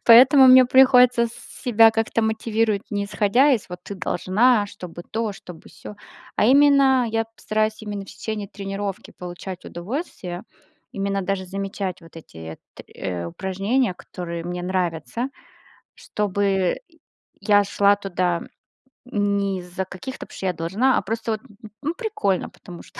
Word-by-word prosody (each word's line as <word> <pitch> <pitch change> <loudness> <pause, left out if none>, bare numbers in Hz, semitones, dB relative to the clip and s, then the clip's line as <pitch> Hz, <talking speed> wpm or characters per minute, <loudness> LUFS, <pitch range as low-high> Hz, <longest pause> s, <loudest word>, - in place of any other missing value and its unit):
поэтому 260 +3 +8
мне 255 0 +9
приходится 250 -2 +6
с 230 - -10 0.3
себя 225 -2 +6
как-то 225 +1 0
мотивировать. 220 -1 0
Не 205 -1 -1
исходя 215 +7 +3
из, 225 -7 -1
вот, 180 0 -8
ты 200 - -6
должна, 205 +5 +2
чтобы 180 -4 -9
то, 225 -1 -2
чтобы 180 -4 -12
сё. 210 - -11 0.4
А - - +3
именно 270 -1 +5
я 225 0 0
постараюсь 215 0 -1
именно 205 -2 -5
в 195 - -12
течение 210 -1 -5
тренировки 195 -1 -5
получать 180 +1 -8
удовольствие, 180 - -6 0.5
именно 200 0 -1
даже 190 0 -2
замечать 195 -1 -4
вот 165 0 -16
эти 80 - -10 0.2
т - - -12
э, 90 -2 -4
упражнения, 195 - -1
которые 170 -2 -7
мне 175 0 -4
нравятся. 180 - -2 0.7
Чтобы 195 -2 0 0.6
я 205 -1 +4
шла 200 +1 +3
туда 180 -3 -1 0.6
не 200 -4 0
из-за 180 +1 -5
каких-то 255 +9 -8
"потому - - -14
что - - -5
я 180 - 0
должна", 195 +11 +1
а - - +1
просто, 225 +1 -3
вот, 215 - -5 0.4
ну 310 +3 -2
прикольно 425 - -1
потому 175 -1 -12
что. - - -13
200 Hz, 145 wpm, -23 LUFS, 185-230 Hz, 0.7 s, мне